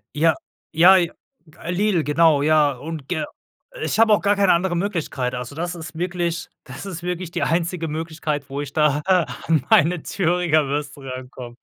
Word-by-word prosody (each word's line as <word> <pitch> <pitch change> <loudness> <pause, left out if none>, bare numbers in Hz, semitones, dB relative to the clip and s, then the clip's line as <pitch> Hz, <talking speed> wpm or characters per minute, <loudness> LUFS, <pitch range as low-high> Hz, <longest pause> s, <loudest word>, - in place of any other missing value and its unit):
Ja, 160 +1 +3 0.4
ja 175 +4 +7
j 170 -2 +1 0.5
äh, 170 - -5
Lidl, 185 -3 +1
genau, 150 -1 +3
ja, 155 -2 +4
und 145 +2 -7
ge 170 -4 -2 0.6
ich - - -1
habe 225 -1 +5
auch - - +3
gar 205 0 +2
keine 195 -3 +4
andere 175 +1 0
Möglichkeit. 165 -10 -2
Also, 125 +3 -6
das 175 +2 -3
ist 160 -1 -9
wirklich 175 -1 -2 0.2
das - - -9
ist 175 -4 -6
wirklich 180 -1 -4
die - - -3
einzige 170 0 -1
Möglichkeit, 155 -2 -4
wo 140 +1 -4
ich 145 -1 -6
da 150 -1 +2
an 165 -5 +1
meine 165 +2 +4
Thüringer 170 -5 +1
Würste 145 0 -4
rankomme. 130 -2 -8
165 Hz, 175 wpm, -22 LUFS, 145-175 Hz, 0.6 s, ja